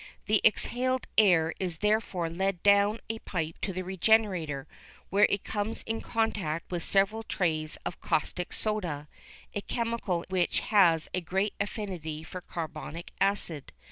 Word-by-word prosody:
The - - +3
exhaled 255 +1 +2
air 165 -6 +5
is 180 -4 -1
therefore 210 -3 +1
led 180 +2 -1
down 205 +2 +4
a 225 0 -3
pipe 165 -6 -4
to 195 - -1
the 185 0 -3
regenerator, 185 -7 +1 0.4
where 205 +2 +6
it 200 - 0
comes 210 +1 -3
into 225 0 -4
contact 205 -9 -1
with 175 -1 -1
several 200 +3 +2
trays 160 -7 -1
of - - -5
caustic 175 +3 -1
soda, 175 -9 -1 0.5
a 205 - -2
chemical 230 -7 -2
which 185 -2 +1
has 175 -7 +4
a 180 - 0
great 190 +4 0
affinity 180 -7 -4
for 180 +2 -7
carbonic 165 0 -6
acid. 195 -7 0
190 Hz, 140 wpm, -29 LUFS, 165-210 Hz, 0.5 s, where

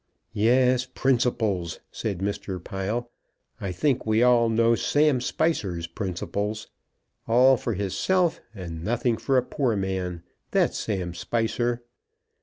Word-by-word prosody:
"Yes; 125 +3 +3
principles!" 115 -11 0
said 100 -5 -4
Mr. 100 -1 -3
Pile. 110 +5 -3 0.5
"I 95 - -3
think 130 - 0
we 110 +2 +2
all 120 -2 +5
know 115 +1 +3
Sam 145 +2 +2
Spicer's 100 - -1
principles. 100 +4 -4 0.6
All 125 +3 +6
for 115 -2 -3
hisself, 160 - +1
and 85 -4 -7
nothing 120 +2 +1
for 135 +2 +1
a 125 - +3
poor 125 -3 0
man. 95 -3 -3 0.3
That's - - +1
Sam 95 -5 -2
Spicer." 120 +5 -1
115 Hz, 120 wpm, -25 LUFS, 95-125 Hz, 0.6 s, All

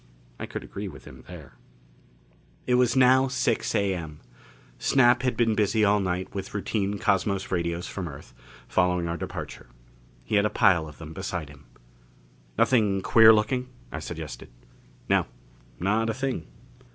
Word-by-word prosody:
I - - -5
could - - -6
agree 100 +1 -6
with 70 -8 -11
him 65 -1 -13
there.... 80 -6 -12 1.1
It 125 - +1
was 125 0 +3
now 130 +1 +5
six 125 -3 -1
A.M. 85 -6 -2 0.6
Snap 125 -2 +4
had 125 -1 -1
been 115 -2 +2
busy 105 0 +2
all 105 +1 +3
night 90 -1 -3
with 95 +1 -6
routine 100 0 -1
cosmos 95 0 0
radios 85 0 -1
from 95 - -5
the 80 - -6
Earth, 70 - -13 0.3
following 90 -1 +1
our 85 - -2
departure. 85 - -7 0.6
He 105 - 0
had 100 - +3
a - - -4
pile 85 -6 +3
of 75 - -12
them 80 -1 -9
beside 90 -4 -5
him. 70 -3 -16 0.9
"Nothing 105 -6 +2
queer 110 -1 +7
looking?" 125 +4 +1 0.2
I - - -5
suggested. - - -7 0.6
"No. - - +2 0.5
Not 105 +5 +1
a 110 - -2
thing." 130 -10 -3
100 Hz, 155 wpm, -26 LUFS, 85-115 Hz, 1.1 s, queer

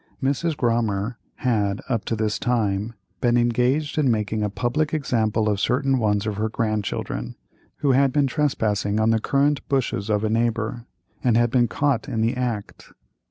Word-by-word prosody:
Mrs. 145 +4 0
Grommer 115 -2 0 0.2
had, 105 -5 0
up 115 -5 -1
to 115 - -1
this 110 -1 -1
time, 110 -2 0 0.2
been 120 -1 +3
engaged 125 +6 +1
in 140 -4 +3
making 110 -1 0
a 105 - 0
public 140 +8 -1
example 110 -6 0
of 105 -2 +1
certain 135 +4 +1
ones 105 -2 +1
of 105 -2 -2
her 110 +1 0
grandchildren, 110 - -2 0.4
who 140 - +2
had 135 +1 +4
been 145 +1 +2
trespassing 110 -7 0
on 110 +1 +3
the 115 - +2
currant 140 +3 +2
bushes 115 -7 -1
of 105 0 +1
a 110 - +1
neighbor, 115 +1 -1 0.4
and 120 -3 +3
had 120 0 +2
been 120 -2 +3
caught 140 -1 0
in 115 -4 -1
the 115 +3 +1
act. 120 -5 -4
115 Hz, 170 wpm, -23 LUFS, 110-130 Hz, 0.4 s, had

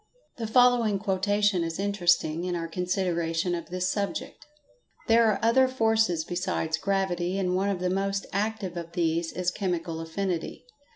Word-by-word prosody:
The 230 -2 -3
following 240 -3 +4
quotation 205 -1 +1
is 165 0 -4
interesting, 175 -5 +1
in 180 -1 -2
our 165 -1 -3
consideration 175 -1 -1
of 170 -1 -4
this 180 +1 -1
subject: 215 +9 -4 0.6
"There 230 0 +5
are 210 -2 +2
other 260 +3 +5
forces 220 -9 +1
besides 175 -3 -2
gravity, 190 -2 -1
and 180 -2 0
one 195 +2 +1
of 195 -3 -1
the 180 0 0
most 195 +1 -1
active 200 -2 -2
of 170 0 -7
these 165 -1 0
is 180 0 -1
chemical 175 -4 -3
affinity. 170 +4 -3
185 Hz, 155 wpm, -27 LUFS, 175-205 Hz, 0.6 s, There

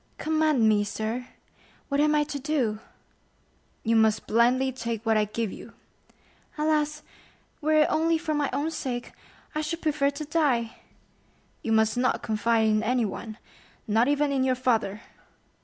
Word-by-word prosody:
"Command 310 -6 +2
me, 210 -1 +3
sir—what 240 +6 -6
am 300 +1 +3
I 300 - +3
to 290 -1 -5
do?" 260 -7 -1 1.0
"You 230 +1 +2
must 220 -1 +3
blindly 250 +4 +3
take 235 -3 -5
what 225 0 +3
I 215 -1 +3
give 215 0 -3
you." - - -11 0.8
"Alas, 300 0 0 0.6
were 310 0 +4
it - - +1
only 325 +1 +2
for 315 -1 -3
my 295 -2 0
own 305 +3 -1
sake, 245 -5 -4 0.4
I 305 - -1
should 330 +2 -4
prefer 295 -3 +2
to 285 +2 -6
die!" 280 -7 0 0.8
"You 225 - -3
must 220 +1 +3
not 250 +1 +1
confide 225 +1 +1
in 215 -1 +2
anyone—not 225 0 -2
even 290 0 +1
in 270 -2 +1
your 260 -1 +2
father." 230 -5 0
255 Hz, 145 wpm, -26 LUFS, 225-300 Hz, 1.0 s, were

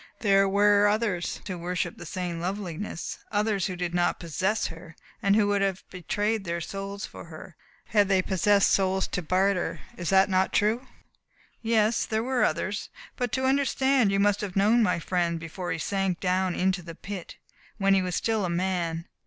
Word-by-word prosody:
There 195 -2 +4
were 205 +1 +4
others 205 -4 -1
who 185 -3 -5
worshipped 175 0 -3
that 175 - -8
same 175 -1 -4
loveliness 185 -2 -4
others 205 -2 +1
who 185 - -4
did 175 -1 -3
not 175 0 +1
possess 190 +6 -1
her, 165 0 -8 0.3
and 200 0 +3
who 215 -1 +4
would 200 -1 +1
have 195 -1 -1
bartered 205 +4 -1
their 170 -2 -3
souls 195 +3 -5
for - - -10
her 165 +1 -11 0.3
had 205 -2 +3
they 190 -2 +3
possessed 200 +2 +3
souls 190 0 +2
to 180 - -2
barter. 185 +2 0 0.2
Is 175 -2 -3
that 190 0 +5
not 190 -1 +1
true?" 225 +5 +1 0.7
"Yes, 220 -1 +2
there 220 0 -1
were 255 0 +1
others. - - -1 0.3
But 245 -3 -2
to 260 -1 0
understand 265 -3 +2
you 195 - +1
must 205 0 +2
have 200 -3 -5
known 215 +4 +4
my 180 -6 +2
friend 170 -1 -1
before 165 +2 -5
he 165 - -1
sank 195 +1 -1
down 185 0 0
into 185 0 +1
the 165 -1 -9
pit 195 -1 -8 0.4
when 195 -1 +3
he 195 - +4
was 180 -2 -2
still 220 -2 0
a 180 - -1
man. 170 -2 -1
195 Hz, 185 wpm, -27 LUFS, 175-205 Hz, 0.7 s, that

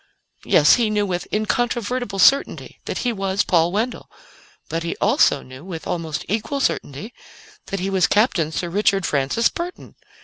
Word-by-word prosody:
Yes, 150 - +5
he 235 -3 +1
knew 210 -1 +1
with 180 -2 -3
incontrovertible 230 +1 -1
certainty 275 +8 +2
that - - -4
he 240 - +1
was 195 -1 -1
Paul 170 -1 +2
Wendell. 225 +5 -3 0.6
But 165 - -3
he 165 - -3
also - - +2
knew, 130 +2 -12
with 175 -3 -7
almost 165 -4 -3
equal 225 +7 -2
certainty, 210 - -2 0.5
that 195 - -3
he 190 +2 -2
was 190 -2 +3
Captain 200 - +2
Sir 175 +2 -3
Richard 195 -1 +1
Francis 140 +11 +1
Burton. 350 +1 -7
195 Hz, 160 wpm, -21 LUFS, 170-225 Hz, 0.6 s, Yes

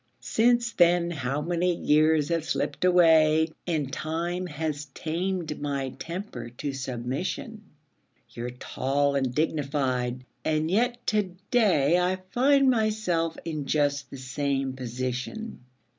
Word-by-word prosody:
Since 235 +1 +2
then 175 -2 +3
how 140 -1 -2
many 175 +1 +1
years 155 -1 +3
have 165 -2 0
slipped - - -2
away? 160 -3 +5 0.2
And 150 -6 -1
time 170 +5 -2
has 150 -2 -3
tamed 170 -1 -3
my 140 -2 -2
temper 170 - -6
to 145 -1 -3
submission. 135 - -4 0.7
You're 120 +1 -5
tall 135 +3 -1
and 135 -2 +1
dignified, 135 -5 -1 0.2
and 155 +1 0
yet 240 +4 +1
to 205 -4 0 0.2
day 180 - +4
I 180 +1 +1 0.2
find 275 +2 +4
myself 215 -9 +1
in 155 -4 -4
just 140 -2 +1
the 135 - -8
same 135 +1 -2
position. 130 - -4
155 Hz, 120 wpm, -27 LUFS, 140-180 Hz, 0.7 s, away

